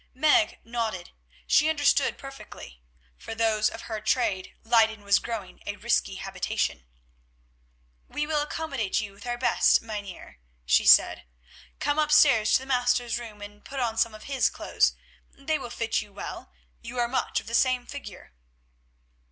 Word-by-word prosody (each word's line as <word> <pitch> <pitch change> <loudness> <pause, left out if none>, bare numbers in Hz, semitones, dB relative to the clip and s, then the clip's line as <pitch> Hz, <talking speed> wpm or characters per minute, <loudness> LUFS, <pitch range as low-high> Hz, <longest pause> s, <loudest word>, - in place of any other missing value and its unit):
Meg 310 +4 +3
nodded. 225 -6 -4 0.3
She 315 0 +4
understood 290 -3 +2
perfectly; 270 - -11 0.4
for 225 - -7
those 220 -1 +2
of 225 - -9
her 220 -2 -5
trade 205 -4 -1
Leyden 220 -2 +3
was 200 0 +4
growing 225 -5 -6
a - - -3
risky - - 0
habitation. 60 0 -3 1.2
"We 295 - -3
will 300 -1 0
accommodate 285 -9 -2
you 215 -2 -5
with 205 +4 -12
our 240 0 -2
best, 250 - +3
Mynheer," 205 - -8 0.3
she 60 - +3
said. - - +6 0.5
"Come 290 +1 0
upstairs 295 -7 +5
to - - +5
the - - -9
Master's 245 -2 +1
room 215 -3 -10
and 205 0 -12
put 275 - -6
on 235 -3 -1
some 225 -1 +1
of 215 - -12
his 275 -2 +1
clothes. - - +1 0.4
They 305 +3 -1
will - - -7
fit 230 -1 -1
you 210 - -12
well; 200 - -8 0.3
you 250 - -8
are 240 -1 +2
much 255 - -1
of - - -13
the 230 - -8
same 250 0 +2
figure." 245 - -10
235 Hz, 160 wpm, -26 LUFS, 215-275 Hz, 1.2 s, said